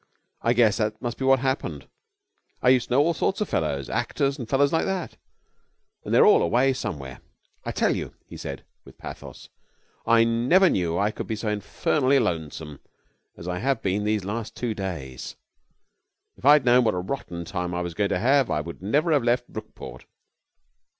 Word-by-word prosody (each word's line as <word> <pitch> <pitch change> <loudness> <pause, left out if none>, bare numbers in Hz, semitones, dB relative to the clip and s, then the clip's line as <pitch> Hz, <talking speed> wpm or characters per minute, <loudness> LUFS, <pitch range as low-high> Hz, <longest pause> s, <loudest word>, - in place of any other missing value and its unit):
I 115 - +2
guess 115 -4 +3
that 110 -1 -1
must 120 -1 -5
be 135 - -1
what 135 -1 +4
happened. 135 0 -2 0.7
I 125 - +3
used 125 -1 +3
to 125 - 0
know 140 - +6
all 170 +2 +1
sorts 180 +6 -1
of 210 - -1
fellows, 70 -4 -1
actors 140 +1 -1
and 120 -3 -6
fellows 140 +2 +2
like 160 - +2
that, 190 -3 -3 0.9
and - - -6
they're - - +6
all - - +6
away 125 +9 +2
somewhere. 75 - -6 0.4
I - - -2
tell - - +1
you,' - - -6
he - - -12
said, - - -7 0.2
with - - -16
pathos, - - -10 0.6
'I 115 0 +6
never 125 +12 +4
knew 85 -2 0
I 105 +3 +1
could - - -6
be 110 - -2
so 105 +1 -3
infernally 130 +6 +1
lonesome 80 - -3 0.6
as 85 - -9
I 90 0 -2
have 135 +2 -1
been 100 +2 0
these 105 -2 0
last 110 +2 -4
two 120 -3 -2
days. 85 -11 -6 1.0
If - - -12
I 145 - +9
had 150 -4 +4
known 125 +1 +5
what 110 -4 +1
a - - -1
rotten 90 -5 -5
time 90 +1 -3
I 90 - -1
was 85 -1 -5
going 100 +2 0
to - - 0
have 130 +4 +3
I - - 0
would 85 +3 -7
never 145 - +1
have 145 -5 +3
left 120 +1 +1
Brookport.' 110 - -9
115 Hz, 195 wpm, -25 LUFS, 90-135 Hz, 1.0 s, I